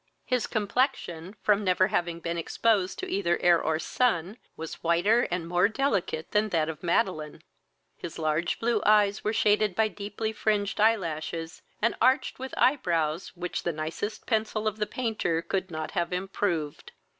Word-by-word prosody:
His 250 -3 0
complexion, 205 - -1
from 210 0 +3
never 185 0 +3
having 170 -1 -1
been 170 0 -2
exposed 190 +3 +1
to - - -4
either 175 -3 +1
air 175 -1 +4
or 160 0 0
sun, 195 0 0 0.2
was 160 0 -7
whiter 180 +8 +3
and 175 -1 -2
more 180 +3 +3
delicate 210 - -1
that 210 +1 +2
that 160 -4 +1
of 160 -1 -6
Madeline: 170 -4 -1 0.5
his 170 - -7
large 155 +1 0
blue 230 -1 +1
eyes 210 -1 +4
were 215 - +1
shaded 210 -3 +2
by 220 -1 +2
deeply 210 +2 -4
fringed 210 -2 0
eye 225 +1 +6
lashes, 165 -2 -5 0.2
and 230 - +3
arched 260 +3 +2
with 265 0 -6
eye 275 +3 +4
brows 165 - -1
which 180 0 -3
the 175 - -1
nicest 160 +7 -4
pencil 220 -1 0
of 215 0 -1
the 210 -1 -1
painter 220 -9 -1
could 190 -1 -2
not 155 -2 -5
have 175 -3 -1
improved. 180 -4 -2
190 Hz, 165 wpm, -27 LUFS, 170-215 Hz, 0.5 s, eye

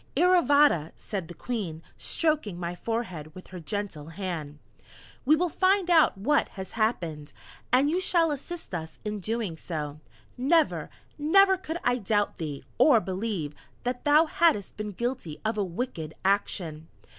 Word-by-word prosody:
"Iravata," 290 - +4
said 195 -6 -5
the 175 - -10
Queen, 185 -10 -4
stroking 300 - 0
my 175 0 -3
forehead 180 -7 -4
with 185 - -11
her 185 - -8
gentle 175 -4 -4
hand, 165 -4 -5 0.7
"We 300 +4 +6
will 355 +3 +1
find 370 +2 +2
out 320 - +5
what 280 +9 +2
has 190 -1 -6
happened, 170 -10 -1 0.4
and 260 +3 +5
you 335 +5 +1
shall 335 -4 +3
assist 325 - -6
us 160 -2 -5
in 210 0 -2
doing 215 -3 -2
so. 150 -3 -5 0.4
Never, 310 +5 +2 0.3
never 385 +6 +5
could 345 -3 -5
I 245 0 +2
doubt 205 0 0
thee, 150 -4 -5 0.2
or 265 -7 +7
believe 190 -6 -3 0.3
that 250 0 -2
thou 300 +2 +6
hadst 315 - +2
been 210 0 -4
guilty 235 -8 -3
of 220 +1 +1
a 210 - 0
wicked 170 -4 -4
action. 170 -5 0
210 Hz, 150 wpm, -27 LUFS, -, 0.7 s, or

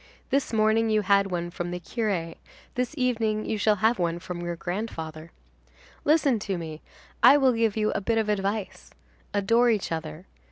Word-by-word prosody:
"This 275 +1 +1
morning 220 0 +2
you 215 -1 +2
had 200 0 +3
one 175 -1 -3
from 175 0 -4
the 180 0 -4
curé, 180 -4 -3 0.4
this 250 +4 -2
evening 225 -4 0
you 215 - -2
shall 210 0 +3
have 230 -1 +3
one 170 -1 0
from 175 0 -6
your 175 0 -3
grandfather. 165 -4 -5 0.7
Listen 290 -6 +3
to 195 -2 -3
me; 160 -2 -7 0.4
I 290 - +8
will 265 -3 +4
give 225 -2 +1
you 215 0 +1
a 215 - -2
bit 225 +3 0
of 220 -1 +1
advice: 205 0 -2 0.4
Adore 230 +4 +3
each 215 -6 0
other. 160 +1 -5
210 Hz, 175 wpm, -26 LUFS, 175-225 Hz, 0.7 s, I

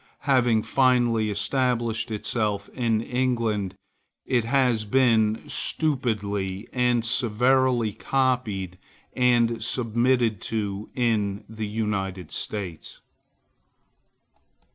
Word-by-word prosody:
Having 125 -5 +2
finally 120 -4 +2
established 115 0 0
itself 105 -1 -2
in 115 -3 0
England, 115 -6 -1 0.5
it 120 -3 +1
has 125 -3 +2
been 110 -2 +3
stupidly 105 - -2
and 125 -2 +1
servilely 125 0 +2
copied 110 -10 -1 0.3
and 120 -2 +2
submitted 120 -2 +1
to 105 -2 -3
in 105 -4 0
the 110 -1 -5
United 100 -5 -3
States. 95 -7 -5
115 Hz, 80 wpm, -25 LUFS, 105-125 Hz, 0.5 s, been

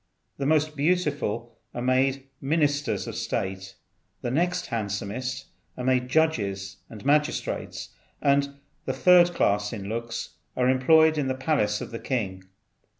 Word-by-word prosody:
The 135 - -1
most 155 0 +2
beautiful 140 - -1 0.2
are 120 - -3
made 130 +1 +2 0.2
ministers 145 - +1
of - - -6
state; 95 0 -3 0.5
the 120 - -1
next 175 +5 0
handsomest 115 +3 -3 0.3
are 125 - -4
made 125 -1 +1
judges 100 -11 0
and 110 +1 -11
magistrates; 150 +1 0 0.3
and 140 0 +2 0.3
the - - -1
third 175 -1 +6
class 105 +1 +1
in 100 -4 -6
looks 115 0 -4 0.3
are 125 -1 +3
employed 155 +4 +5
in 140 - 0
the 130 - -1
palace 130 -7 0
of - - -6
the 115 - -5
king. 95 -8 -3
130 Hz, 140 wpm, -26 LUFS, 110-150 Hz, 0.5 s, third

